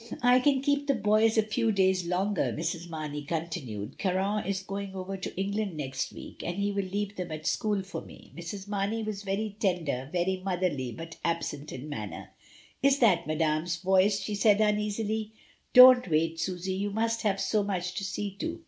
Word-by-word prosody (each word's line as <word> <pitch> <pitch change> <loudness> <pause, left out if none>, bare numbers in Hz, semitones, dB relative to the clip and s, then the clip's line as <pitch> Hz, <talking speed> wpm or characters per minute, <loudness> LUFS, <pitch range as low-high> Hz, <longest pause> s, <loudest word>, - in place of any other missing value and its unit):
"I 245 +1 +6
can 270 0 +3
keep 285 0 +1
the 275 - +3
boys 215 +1 +3
a 220 - +5
few 220 +1 0
days 190 -3 +2
longer," 190 +2 0
Mrs. 170 +1 -3
Marney 155 -2 -4
continued. 150 - -4
"Caron 195 +2 0
is 190 -1 -1
going 195 0 -5
over 190 +1 -4
to 190 -1 -6
Eng 195 +1 -1
land 205 -5 -2
next 135 -3 -3
week, - - -10
and 175 +2 -3
he 200 0 0
will 200 -1 -1
leave 205 +2 -3
them 180 -3 -4
at 155 0 -6
school 210 -3 0
for 190 - -6
me." - - -14
Mrs. 185 +4 -7
Marney 205 +2 -1
was 215 -2 -4
very 205 +1 -2
tender, 160 - -1
very 185 +1 0
motherly, 175 -9 -1
but 165 +5 -8
absent 155 -3 -2
in 130 +3 -7
manner. 110 -9 -6 0.5
"Is 275 0 +4
that 185 - +3
Madame's 155 +2 0
voice?" 190 +3 +3
she 210 - -4
said 205 0 +4
uneasily. 210 +1 0 0.4
"Don't 250 -2 +9
wait, 165 0 +1
Susy, 185 +2 -2
you 200 +2 -1
must 225 +2 0
have 200 -2 +1
so 215 +1 +1
much 180 -3 -2
to - - -4
see 200 +1 -3
to." 330 +1 -3
195 Hz, 190 wpm, -29 LUFS, 170-210 Hz, 0.5 s, Don't